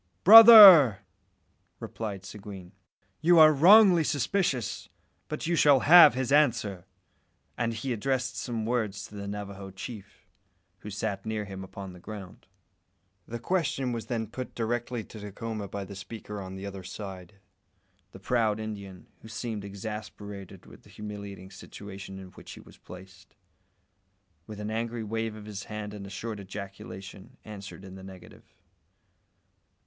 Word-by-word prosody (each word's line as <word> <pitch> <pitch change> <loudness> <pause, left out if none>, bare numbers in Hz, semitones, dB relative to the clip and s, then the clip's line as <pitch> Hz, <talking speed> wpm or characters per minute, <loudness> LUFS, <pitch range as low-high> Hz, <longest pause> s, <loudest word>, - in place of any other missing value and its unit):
"Brother!" 200 - +10 0.8
replied 100 -4 -7
Seguin, 95 -3 -10 0.5
"you 170 +2 +4
are 155 -1 +8
wrongly 180 +3 +6
suspicious, 145 - -2 0.4
but 155 - -5
you 170 +1 0
shall 145 -5 +4
have 165 -3 +8
his 130 0 -2
answer," 110 -10 +1 0.7
and 115 0 -2
he 115 +3 -4
addressed 125 +2 -2
some 115 -3 -4
words 110 -5 -2
to - - -15
the 100 -1 -7
Navajo 100 -1 -7
chief, 100 +2 -11 0.5
who 105 - -9
sat 100 -1 -4
near 110 -1 -4
him 95 -1 -8
upon 95 0 -9
the 90 - -14
ground. 100 -1 -11 0.8
The 120 - -6
question 135 -2 -2
was 115 -2 -5
then 115 -2 -3
put 120 +4 -8
directly 120 0 -3
to 110 - -12
Dacoma 105 +1 -6
by 100 0 -6
the 100 - -10
speaker 105 +1 -8
on 95 0 -8
the 95 +1 -8
other 100 -1 -8
side. 95 0 -9 0.8
The - - -13
proud 110 -4 0
Indian, 100 -4 -8 0.2
who - - -13
seemed 110 -1 -6
exasperated 100 -1 -9
with - - -16
the - - -21
humiliating 100 -2 -9
situation 95 -1 -10
in 95 -1 -11
which - - -13
he - - -12
was - - -17
placed, 95 0 -15 1.1
with 105 -2 -9
an 105 +1 -5
angry 115 +1 -4
wave 110 0 -4
of 105 -1 -11
his 105 -2 -8
hand 105 -1 -7
and 100 -2 -9
a - - -10
short 105 +2 -6
ejaculation, 95 -1 -10
answered 100 -2 -10
in 95 - -11
the 95 0 -11
negative. 95 -2 -15
105 Hz, 150 wpm, -27 LUFS, 100-120 Hz, 1.1 s, Brother